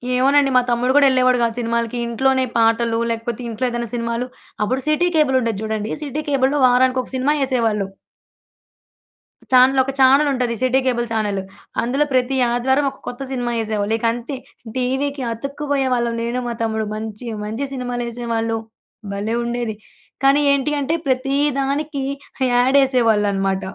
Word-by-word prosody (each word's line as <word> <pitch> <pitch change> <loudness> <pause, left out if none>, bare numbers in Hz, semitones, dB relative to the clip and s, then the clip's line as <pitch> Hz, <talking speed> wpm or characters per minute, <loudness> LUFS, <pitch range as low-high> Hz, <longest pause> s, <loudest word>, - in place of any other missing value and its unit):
ఏమోనండి. 275 +2 +4
మా - - +6
తమ్ముడు 245 +1 +1
గూడా 290 -1 +6
ఎళ్ళేవాడు 255 -1 +3
గాదు 230 -1 +1
సినిమాలకి. 235 0 -1
ఇంట్లోనే 260 +3 +1
పాటలు 230 0 +2
లేకపోతే 230 +1 -4
ఇంట్లో 230 +3 -2
ఏదైనా 235 -1 -3
సినిమాలు 235 +1 -2 0.4
అప్పుడు 255 +5 -1
సిటీ 305 +4 +2
కేబుల్ 275 -4 +3
ఉండేది 225 -4 -2
జూడండి. 220 0 -3
సిటీ 295 +1 -3
కేబుల్‌లో 275 +1 +2
వారానికి 255 +1 +3
ఒక - - -12
సినిమా 260 +3 +2
ఎసేవాళ్ళు. 225 -6 0 1.6
చానెల్, 260 +1 +6
ఒక 270 - -3
చానెల్ 275 +3 +5
ఉంటది 250 -2 -1
సిటీ 255 +1 +3
కేబుల్ 240 -2 +1
చానెలు. 205 -3 -1 0.4
అందులో 270 +5 +1
ప్రతి 255 +1 +1
ఆదివారం 265 +4 +1
ఒక 270 - -18
కొత్త 245 - -6
సినిమా 245 -2 -2
ఎసేవాళ్ళు 215 0 -1
ఇకంతే. 235 +4 -2 0.4
టీవీకి 265 +2 -1
అతుక్కుబోయేవాళ్ళం 265 -2 -1
నేను 240 +2 -2
మా 240 - -2
తమ్ముడు. 220 -1 -1
మంచి 215 +2 -6 0.2
మంచి 225 +6 -3
సినిమాలు 245 -2 -3
ఎసేవాళ్ళు. 230 -1 -2 0.6
భలే 210 +3 -2
ఉండేది! 235 -2 -3 0.5
కానీ 275 +1 +5
ఏంటి 280 +2 0
అంటే 285 +4 0
ప్రతి 265 +1 0 0.2
దానికి 280 +1 -2 0.5
యాడ్ 250 +3 +4
ఎసేవాళ్ళన్నమాట. 205 -6 +1
245 Hz, 145 wpm, -20 LUFS, 230-265 Hz, 1.6 s, మా